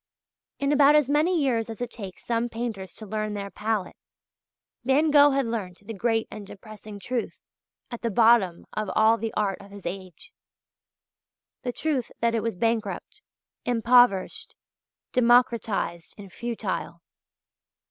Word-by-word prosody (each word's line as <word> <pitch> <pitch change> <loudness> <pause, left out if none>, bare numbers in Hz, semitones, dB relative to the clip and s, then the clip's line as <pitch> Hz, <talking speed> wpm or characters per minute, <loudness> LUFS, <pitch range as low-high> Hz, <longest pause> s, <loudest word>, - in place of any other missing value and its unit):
In 280 0 0
about 290 0 +6
as 290 -2 +3
many 325 +4 +3
years 240 -6 0
as 225 - -7
it 245 -1 -4
takes 195 -5 -9
some 235 0 0
painters 225 -6 -5
to 220 - -9
learn 215 0 -3
their 200 -1 -5
palette, 210 -3 -2 0.9
Van 285 +5 +3
Gogh 290 0 +7
had 275 -1 +1
learnt 205 -5 -5
the 225 - -6
great 225 +2 0
and 210 -2 -8
depressing 215 +1 -11
truth 240 +3 -3 0.5
at 240 - -6
the 235 - -1
bottom 220 -5 +3
of 215 -2 -3
all 220 +1 +4
the 225 -1 -3
art 200 -3 -1
of 200 - -14
his 200 -1 -12
age 185 - -7 1.3
the 250 - -2
truth 270 -2 -2
that 230 0 +1
it 225 - +1
was 225 -1 -2
bankrupt, 225 0 -2 0.4
impoverished, 245 -4 +3 0.6
democratized, 235 -8 +2
and 195 -3 -12
futile. 235 -1 -4
225 Hz, 145 wpm, -26 LUFS, 205-245 Hz, 1.3 s, Gogh